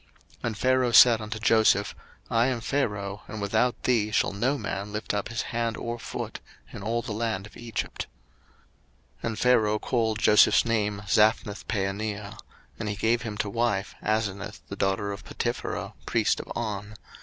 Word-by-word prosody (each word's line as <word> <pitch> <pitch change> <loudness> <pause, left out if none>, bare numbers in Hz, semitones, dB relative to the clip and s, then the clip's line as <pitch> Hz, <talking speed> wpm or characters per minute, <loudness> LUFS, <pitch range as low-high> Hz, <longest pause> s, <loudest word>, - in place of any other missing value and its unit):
01:041:044 - - -32 0.4
And 110 -3 -2
Pharaoh 130 0 +2
said 115 -1 +8
unto 110 0 -5
Joseph, 110 -2 +3 0.4
I 115 +1 +3
am 130 -3 0
Pharaoh, 105 -6 -2
and 110 - -6
without 110 +5 0
thee 115 -4 +2
shall 105 - +2
no 125 +8 +1
man 100 -5 -4
lift 105 0 -3
up 105 -1 -2
his 115 -1 -2
hand 115 -1 -1
or 120 0 -4
foot - - -5 0.3
in - - -7
all 115 +3 -1
the - - -5
land 110 -3 -2
of 105 - -14
Egypt. 120 -1 -4 1.2
01:041:045 - - 0
And 110 -1 -3
Pharaoh 110 -4 +4
called 110 -1 0
Joseph's 105 +2 +5
name 105 -3 0
Zaphnathpaaneah; 105 -1 0 0.4
and 110 -2 -2
he 105 - -2
gave 115 +3 +1
him 110 -3 -5
to 105 - -1
wife 115 -3 0
Asenath 105 -1 -2
the 100 - -5
daughter 100 +1 0
of 100 - -7
Potipherah - - -3
priest - - +2
of - - -8
On. 105 -2 -4
110 Hz, 165 wpm, -27 LUFS, 105-115 Hz, 1.2 s, said